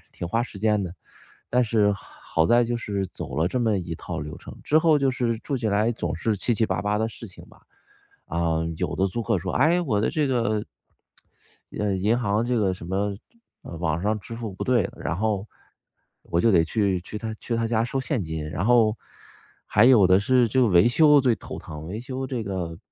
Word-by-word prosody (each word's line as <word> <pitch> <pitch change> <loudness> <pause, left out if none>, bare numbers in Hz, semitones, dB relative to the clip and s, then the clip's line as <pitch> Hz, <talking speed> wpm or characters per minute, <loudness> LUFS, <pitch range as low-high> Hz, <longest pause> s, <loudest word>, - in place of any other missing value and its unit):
挺 85 - -6
花 115 +5 +1
时 105 -5 -8
间 105 -1 +2
的， 85 - -6 0.6
但 125 +1 +3
是 105 -3 +2
好 80 -3 -2
在 120 0 +4
就 120 +1 -2
是 100 -3 -3
走 65 - -7
了 80 +3 +2
这 125 +6 -1
么 110 -3 +2
一 85 -2 -5
套 - - -6
流 75 +1 -6
程。 - - -11
之 155 - +4
后 160 -2 +4
就 135 -1 +2
是 120 -2 -1
住 145 - -4
起 115 - -1
来 105 +3 +2
总 85 -6 -3
是 110 +5 0
七 120 +5 0
七 110 - +1
八 95 -3 -1
八 105 0 0
的 110 - +1
事 115 -1 -10
情 90 - -13
吧， - - -20 0.7
啊， 85 -1 0 0.2
有 - - -2
的 95 - +2
租 115 +6 -3
客 115 -4 0
说： 95 +2 -4
“哎， 165 +6 +3
我 110 -11 0
的 110 - +1
这 155 -4 0
个” 115 -5 0 1.2
“哎， 105 -1 0
银 105 +5 +1
行 110 -1 0
这 125 0 0
个 95 -4 +1
什 85 - -9
么， 100 +2 -1 0.5
呃， - - -8
网 80 0 -1
上 105 +2 0
支 115 +4 -9
付 115 -4 -6
不 95 - -5
对。” 120 -6 +2
然 85 - -3
后， 105 -1 -1 0.8
我 85 - -1
就 115 - +4
得 85 -3 +5
去 100 +1 0
去 105 - -7
他 110 +1 -5
去 115 +1 -4
他 115 0 0
家 115 0 +1
收 135 +3 -2
现 130 - -2
金。 80 -1 -5
然 85 +5 -2
后， 115 -2 +4 0.7
还 105 - +4
有 120 -7 +6
的 95 +1 +5
是， 125 +3 +3
这 130 +4 +2
个 120 - +4
维 90 +2 +5
修 150 +3 +5
最 125 -4 +2
头 - - -8
疼。 75 0 -9
维 105 +5 -5
修 130 +2 -5
这 125 -2 -3
个， 90 -5 -4
110 Hz, 240 characters per minute, -24 LUFS, 95-120 Hz, 1.2 s, 有